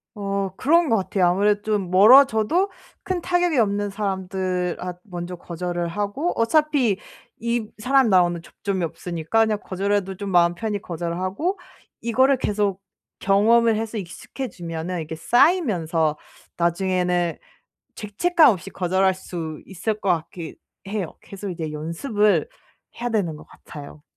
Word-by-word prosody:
어 200 -2 -2
그런 330 +3 +3
것 225 - +3
같아요. 190 -1 +1
아무래도 205 +3 +2
좀 210 -4 -1
멀어져도 240 - +6 0.3
큰 365 -2 -2
타격이 355 -4 +1
없는 205 -1 +1
사람들 190 -3 -2
앗 180 -1 -6
먼저 180 -2 -6
거절을 175 0 -4
하고 205 - -2
어차피 255 -3 +2 0.4
이 235 -1 -1
사람 255 +2 +3
나오는 175 -2 +3
접점이 190 +1 -4
없으니까 170 +6 0
그냥 210 -1 -1
거절해도 195 0 -1
좀 200 +1 -5
마음 175 -1 +4
편히 205 +2 -3
거절을 170 0 -4
하고 205 - -2 0.4
이거를 260 +4 +3
계속 200 -4 -1 0.4
경험을 220 +3 +4
해서 225 0 -4
익숙해지면은 180 -3 -6
이렇게 160 0 -5
쌓이면서 165 - +2 0.4
나중에는 180 0 0 0.6
죄책감 305 - +3
없이 195 -2 -4
거절할 190 +1 +1
수 165 -4 -7
있을 205 +3 -3
것 195 - -2
같기는 165 -1 -2 0.3
해요. 195 -5 -3
계속 200 0 -7
이제 160 -3 -5
연습을 170 - 0 0.5
해야 240 0 -2
되는 180 -8 -1
것 - - -14
같아요. 145 0 -12
195 Hz, 310 characters per minute, -23 LUFS, 175-225 Hz, 0.6 s, 멀어져도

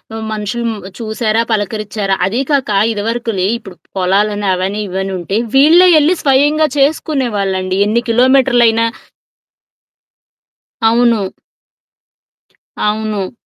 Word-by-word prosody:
ఆహ్, 220 0 -5
మనుషులు 215 +3 -3
మ్ 210 -2 -7 0.2
చూశారా, 220 0 -1
పలకరిచ్చారా. 210 -1 -2
అదీ 230 +7 -1
కాక 260 -8 +1
ఇదివరకులే 225 -2 -2
ఇప్పుడు 190 -6 -13 0.2
పొలాలని, 205 +2 0
అవని, 195 +3 -3
ఇవనుంటే 190 +1 -3 0.2
వీళ్ళే 330 +6 +6
యెళ్ళి 310 +4 +3
స్వయంగా 290 +3 +3
చేసుకునేవాళ్ళండి 210 -11 -1
ఎన్ని 235 +3 0
కిలోమీటర్లయినా 240 -2 +3 2.0
అవును. 235 -1 +3 1.6
అవును. 210 -2 -2
220 Hz, 90 wpm, -14 LUFS, 200-245 Hz, 2.0 s, వీళ్ళే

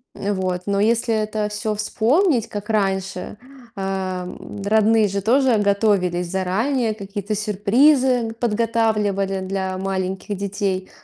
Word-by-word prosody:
Вот. 185 -3 -2
Но 200 -1 0
если 230 +2 +2
это 215 -1 -1
всё 210 +1 -2
вспомнить, 235 - +1
как 210 +2 -5
раньше, 195 -1 -1 0.4
э, 190 -2 -3 0.4
родные 220 0 +4
же 200 0 -2
тоже 250 +2 +3
готовились 200 -4 +1
заранее, 215 +5 0
какие-то 205 0 -4
сюрпризы 235 +4 +3
подготавливали 210 -4 0
для 190 0 -3
маленьких 190 +1 -3
детей. 195 -1 -2
205 Hz, 110 wpm, -21 LUFS, 195-225 Hz, 0.4 s, родные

